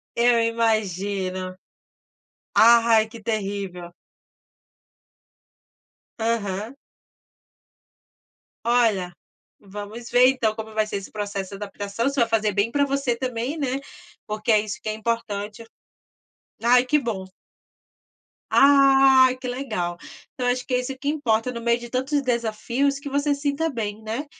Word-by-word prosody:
Eu 235 0 +4
imagino. 200 -5 -1 1.0
Ai 230 -1 +6
que 225 0 -12
terrível. 195 -5 -4 2.3
Aham. 220 0 -2 1.9
Olha, 225 -7 +2 0.5
vamos 205 +4 -9
ver 250 +1 +6
então 225 -5 0
como 220 0 -7
vai 215 0 +1
ser 215 - -5
esse 195 -1 -6
processo 200 -2 -4
de 200 - -8
adaptação, 205 +2 -4
você 275 -2 0
vai 230 - +2
fazer 215 -2 +1
bem 205 +4 +1
para 285 +2 +2
você 275 -3 0
também, 250 +3 -3
né, 270 -3 -1 0.5
porque 215 +2 -1
é 215 - +5
isso 215 +1 -6
que - - -8
é - - -1
importante. 215 -1 -4 1.0
Ai 245 +2 +5
que 300 +4 +2
bom. 225 -8 -3 1.3
Ai 270 -2 +6
que 255 0 -7
legal. 215 -10 -3 0.4
Então 250 -1 -3
acho 250 0 0
que - - -4
é 250 - +3
isso 260 +1 -5
que 280 - -7
importa, 250 -6 0
no 235 -1 -6
meio 235 0 +1
de 240 0 -9
tantos 265 +4 0
desafios 245 +3 -1
que 280 - -7
você 285 +1 +1
se 280 - -7
sinta 295 +3 0
bem, 215 -4 -4
né, 225 +7 -4
230 Hz, 135 wpm, -23 LUFS, 210-255 Hz, 2.3 s, Ai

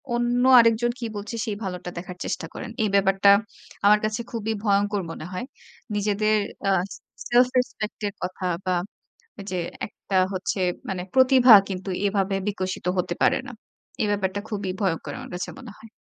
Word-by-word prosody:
অন্য 240 +1 +1 0.2
আরেকজন 230 +1 +4
কি 235 - -4
বলছে, 205 +3 -5
সেই 210 -2 -3
ভালোটা 180 -1 -5
দেখার 180 +1 -7
চেষ্টা - - -3
করেন। - - -7
এই 210 - +1
ব্যাপারটা 195 0 +4 0.6
আমার 210 +1 +6
কাছে 215 +2 -2
খুবই 225 -1 -2
ভয়ংকর 205 -1 +2
মনে 160 - -7
হয়। 185 +7 -4 0.5
নিজেদের 210 +1 +1 0.3
আ - - +4 0.6
সেলফ 245 +1 +5
রেসপেক্ট 220 -4 -4
এর 200 - -5
কথা 185 0 -4 0.2
বা 185 -1 +1 0.8
যে 185 - -1 0.3
একটা 195 -1 -3 0.2
হচ্ছে 190 +1 -2 0.3
মানে 185 -2 -2
প্রতিভা 260 -2 +7 0.2
কিন্তু 190 +1 -5 0.2
এভাবে 195 -1 +1
বিকশিত 185 -3 -3
হতে 175 -1 0
পারে - - +4
না। - - -7 0.5
এ - - +2
ব্যাপারটা 200 0 -1
খুবই 200 -3 -3
ভয়ংকর 175 -5 -1
আমার - - -9
কাছে 180 - -4
মনে 245 -5 -10
হয়। 225 - -14
205 Hz, 160 wpm, -24 LUFS, 190-225 Hz, 0.8 s, প্রতিভা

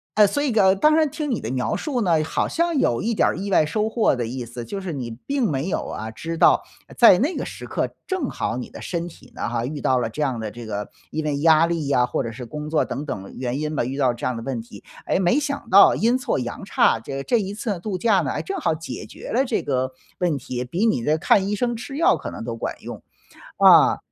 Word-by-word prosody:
哎， 210 -1 +6
所 285 +8 -1
以 280 - +1
个 195 -4 +4
当 305 +10 +4
然 315 -1 +3
听 295 -1 -4
你 235 - 0
的 110 - -5
描 130 -1 -1
述 270 -6 -2
呢， 170 -6 +2
好 - - 0
像 335 -1 0
有 120 - +1
一 230 - 0
点 - - +3
儿 - - -3
意 200 +2 -4
外 170 -5 +4
收 215 +7 -1
获 225 0 +2
的 120 -3 -2
意 125 +1 -5
思。 120 0 -8
就 200 - -5
是 185 - -4
你 130 -6 -4 0.2
并 275 -6 0
没 140 +5 -2
有 - - -2
啊， 110 +1 -5
知 165 +8 -5
道 - - +5 0.4
在 230 -7 +8
那 290 - +1
个 - - -3
时 - - -8
刻 - - -3
正 370 -9 -2
好 115 - -3
你 125 - -6
的 - - -11
身 170 -1 -3
体 135 -6 -15
呢 - - -4
哈， 115 0 -2
遇 145 +3 -5
到 130 -2 +2
了 115 - -1
这 115 +7 -6
样 130 -5 0
的 110 -1 -4
这 120 +3 -9
个 105 -1 -4 0.2
因 155 - -2
为 145 -2 -1
压 160 +1 +5
力 165 -4 -2
啊， 125 -3 +3
或 125 - -2
者 115 - -4
是 125 +2 -8
工 150 +6 -6
作 155 -1 +2
等 145 +3 -5
等 100 -8 -6
原 125 0 -2
因 155 0 -2
吧， 120 - 0
遇 135 +2 -4
到 130 -4 +2
这 120 - -6
样 125 - 0
的 115 - -6
问 125 -3 -3
题。 105 -3 -13 0.2
哎， - - +1
没 190 +9 +3
想 280 -5 -4
到 200 0 +7
阴 235 +4 +2
错 260 - -1
阳 120 +8 -5
差， 115 - +3
这 135 +4 -5
这 240 - +2
一 200 -1 -3
次 205 -3 -3
度 195 0 -3
假 215 -2 +3
呢， 145 -7 -1
哎， - - -2
正 390 - -4
好 165 - 0
解 165 +1 -7
决 - - -10
了 260 +4 +2
这 245 - -1
个 130 -1 -1 0.3
问 170 -5 +1
题， 125 -1 -5
比 175 - -1
你 215 - +2
的 150 +6 +1
看 190 +4 +3
医 210 - 0
生 240 +3 0
吃 245 +4 -7
药 330 - +4
可 - - -6
能 - - -7
都 115 -1 -5
管 - - -3
用， - - -6 0.6
嗯。 - - +7
160 Hz, 290 characters per minute, -23 LUFS, -, 0.6 s, 在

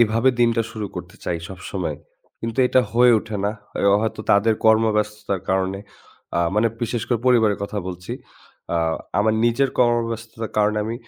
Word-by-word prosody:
এভাবে 115 +2 +3
দিনটা 115 -1 +3
শুরু 110 -2 -4
করতে - - -8
চাই 85 - -1
সবসময়। 90 -4 -5 0.4
কিন্তু 115 +1 -5
এটা 130 - +4
হয়ে 120 +1 +6
ওঠে 110 0 -6
না 100 - +2 0.4
হ - - +5
হয়তো 110 0 -2
তাদের 110 +2 +4
কর্মব্যস্ততার 105 -3 +2
কারণে। 95 0 0 0.6
আ - - +3
মানে, 110 +2 +3
বিশেষ 120 0 -1
করে 120 -3 +1
পরিবারের 110 -5 +4
কথা 105 +1 -3
বলছি। 90 +5 -6 0.6
আ - - +2 0.4
আমার 110 +1 +3
নিজের 125 +3 +2
কর্মব্যস্ততার 115 -2 0
কারণে 105 0 +2
আমি 110 +2 -3
110 Hz, 155 wpm, -22 LUFS, 105-115 Hz, 0.6 s, হয়ে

